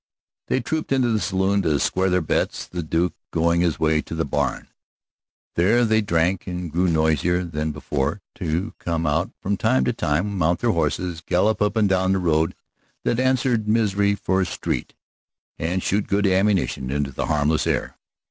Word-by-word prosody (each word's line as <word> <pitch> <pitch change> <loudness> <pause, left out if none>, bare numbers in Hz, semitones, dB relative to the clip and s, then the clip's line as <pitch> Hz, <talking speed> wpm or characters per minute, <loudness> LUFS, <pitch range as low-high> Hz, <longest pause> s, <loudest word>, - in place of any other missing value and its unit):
They 130 - +1
trooped 155 +6 -3
into 130 -3 +2
the 110 - +1
saloon 100 0 +1
to 80 -5 +1
square 95 +1 +1
their 90 0 +2
bets, - - -1
the 90 +7 -5
Duke 85 +2 0 0.2
going 85 +1 +2
his 85 -3 0
way 80 -1 +2
to 80 - -7
the 80 - -1
barn. 70 -2 -2 0.8
There 110 +8 +3
they 110 0 +3
drank 90 -1 0
and 90 -2 -4
grew 90 +4 +1
noisier 80 +2 +2
than 80 -2 -3
before, 75 +4 -2
to 85 +4 -2
come 85 -1 -2
out 80 +4 +1
from 100 +1 -1
time 65 -7 +2
to - - +1
time, 95 +7 -1
mount 85 +1 +1
their 120 - +2
horses, 85 0 -1
gallop 105 +6 +1
up 105 0 +1
and 110 -2 +3
down 95 0 +2
the - - +2
road 80 -3 +1 0.5
that 120 - 0
answered 130 -4 +1
Misery 100 -2 +2
for 95 -1 0
a - - +1
street, - - -3 0.6
and 90 +3 -1
shoot 100 +1 0
good 100 +1 +1
ammunition 95 -8 +1
into 70 0 -1
the - - -3
harmless 75 +1 +1
air. - - -1
90 Hz, 180 wpm, -23 LUFS, 80-100 Hz, 0.8 s, There